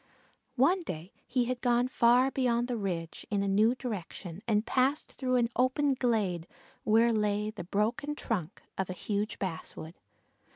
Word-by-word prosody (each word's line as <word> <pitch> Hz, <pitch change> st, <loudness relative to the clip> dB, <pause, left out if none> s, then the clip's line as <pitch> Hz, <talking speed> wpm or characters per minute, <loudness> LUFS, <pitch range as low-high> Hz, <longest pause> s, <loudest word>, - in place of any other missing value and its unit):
One 340 Hz, +9 st, +4 dB
day 175 Hz, -, -6 dB, 0.2 s
he 245 Hz, -1 st, +1 dB
had 250 Hz, 0 st, -3 dB
gone 245 Hz, 0 st, +3 dB
far 250 Hz, +1 st, +4 dB
beyond 240 Hz, -3 st, +1 dB
the 250 Hz, -, -1 dB
ridge 175 Hz, -6 st, -3 dB
in 205 Hz, -1 st, +1 dB
a -, -, -1 dB
new 215 Hz, +5 st, +4 dB
direction 195 Hz, -7 st, -6 dB
and 215 Hz, -1 st, +2 dB
passed 270 Hz, +3 st, +1 dB
through 255 Hz, -1 st, -1 dB
an 235 Hz, -2 st, +3 dB
open 270 Hz, +3 st, +2 dB
glade 210 Hz, -10 st, 0 dB, 0.4 s
where 230 Hz, +2 st, +4 dB
lay 210 Hz, 0 st, 0 dB
the 200 Hz, -6 st, -8 dB
broken 235 Hz, +11 st, -1 dB
trunk 195 Hz, -, -3 dB, 0.2 s
of 190 Hz, -, -1 dB
a -, -, -2 dB
huge 205 Hz, +3 st, -2 dB
basswood. 165 Hz, -3 st, -5 dB
225 Hz, 160 wpm, -30 LUFS, 200-255 Hz, 0.4 s, One